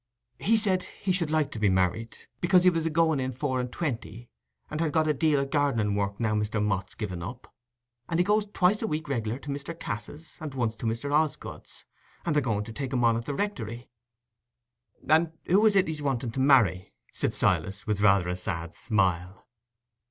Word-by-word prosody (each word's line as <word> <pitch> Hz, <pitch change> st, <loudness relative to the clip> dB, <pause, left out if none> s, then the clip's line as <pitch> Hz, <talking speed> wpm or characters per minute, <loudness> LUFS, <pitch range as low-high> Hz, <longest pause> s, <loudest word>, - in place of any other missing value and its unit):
"He 225 Hz, -, +3 dB
said 195 Hz, -4 st, +1 dB
he 190 Hz, -, -4 dB
should 175 Hz, -4 st, 0 dB
like 155 Hz, -2 st, +1 dB
to 110 Hz, -, -6 dB
be 105 Hz, -2 st, +3 dB
married, 95 Hz, +5 st, 0 dB, 0.2 s
because 180 Hz, +1 st, +4 dB
he 180 Hz, -, +6 dB
was 165 Hz, -1 st, -1 dB
a -, -, +1 dB
going 160 Hz, -2 st, +2 dB
in 130 Hz, 0 st, -1 dB
four 130 Hz, 0 st, -2 dB
and 125 Hz, 0 st, -3 dB
twenty, 120 Hz, -7 st, -4 dB, 0.4 s
and 155 Hz, +1 st, -4 dB
had 160 Hz, -2 st, +1 dB
got 160 Hz, -1 st, +2 dB
a 150 Hz, -, +3 dB
deal 150 Hz, 0 st, +2 dB
of 135 Hz, 0 st, -3 dB
gardening 135 Hz, -8 st, +1 dB
work, 100 Hz, 0 st, -2 dB
now 110 Hz, -2 st, +1 dB
Mr. 105 Hz, +1 st, 0 dB
Mott's 100 Hz, -2 st, -1 dB
given 95 Hz, -6 st, -4 dB
up; 120 Hz, +9 st, -8 dB, 0.6 s
and 165 Hz, -, 0 dB
he -, -, +5 dB
goes 210 Hz, +2 st, +2 dB
twice 200 Hz, 0 st, +2 dB
a 225 Hz, -, -1 dB
week 155 Hz, -3 st, -3 dB
regular 115 Hz, -4 st, -2 dB
to 145 Hz, -, -10 dB
Mr. 145 Hz, +4 st, -5 dB
Cass's, 145 Hz, +7 st, -7 dB
and 155 Hz, -5 st, -6 dB
once 115 Hz, -3 st, -1 dB
to 115 Hz, -, -3 dB
Mr. 115 Hz, +6 st, -2 dB
Osgood's, 155 Hz, -1 st, -2 dB, 0.4 s
and 165 Hz, -, +1 dB
they're 150 Hz, -, +4 dB
going 110 Hz, -5 st, -1 dB
to 110 Hz, -, -9 dB
take 135 Hz, +1 st, -4 dB
him 125 Hz, -2 st, +1 dB
on 115 Hz, -1 st, +4 dB
at 115 Hz, +1 st, -3 dB
the 145 Hz, -, -3 dB
Rectory." 120 Hz, -, -4 dB, 1.2 s
"And 160 Hz, +3 st, +3 dB
who 195 Hz, +5 st, +4 dB
is 210 Hz, -, +3 dB
it 190 Hz, -1 st, +5 dB
as -, -, -5 dB
he's -, -, -8 dB
wanting 130 Hz, -4 st, -1 dB
to 130 Hz, -, -4 dB
marry?" 110 Hz, -, +3 dB, 0.2 s
said -, -, -2 dB
Silas, 100 Hz, +1 st, +1 dB
with 105 Hz, -2 st, -1 dB
rather 100 Hz, -3 st, +4 dB
a 90 Hz, -, -1 dB
sad 85 Hz, -2 st, -4 dB
smile. 90 Hz, -3 st, -1 dB
130 Hz, 210 wpm, -27 LUFS, 105-160 Hz, 1.2 s, he